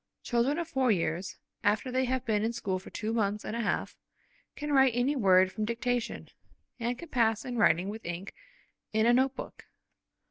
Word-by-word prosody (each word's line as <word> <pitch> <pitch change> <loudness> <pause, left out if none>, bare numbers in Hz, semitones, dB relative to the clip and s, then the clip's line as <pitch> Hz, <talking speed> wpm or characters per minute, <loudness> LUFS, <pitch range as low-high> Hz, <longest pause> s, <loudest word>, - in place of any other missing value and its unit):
Children 245 +5 +1
of 340 -1 -2
four 265 -5 +1
years, 175 -1 -1 0.3
after 215 +5 +1
they 260 +1 +1
have 260 0 -1
been 215 -2 +1
in 230 +1 0
school 195 -5 -2
for 185 - -12
two 220 +1 -3
months 210 -2 0
and 215 - -4
a - - -2
half, 210 - -1 0.6
can 295 0 -3
write 265 -3 +5
any 255 +4 +1
word 190 -6 +4
from 215 - -3
dictation, 235 +2 -2 0.5
and 240 +1 -1
can 340 - -10
pass 225 -4 +2
to 250 - -6
writing 185 -6 +3
with 220 +2 -6
ink 175 +3 -5 0.6
in 220 +1 +3
a 240 - +5
note 260 +2 +2
book. - - -9
230 Hz, 190 wpm, -30 LUFS, 205-255 Hz, 0.6 s, write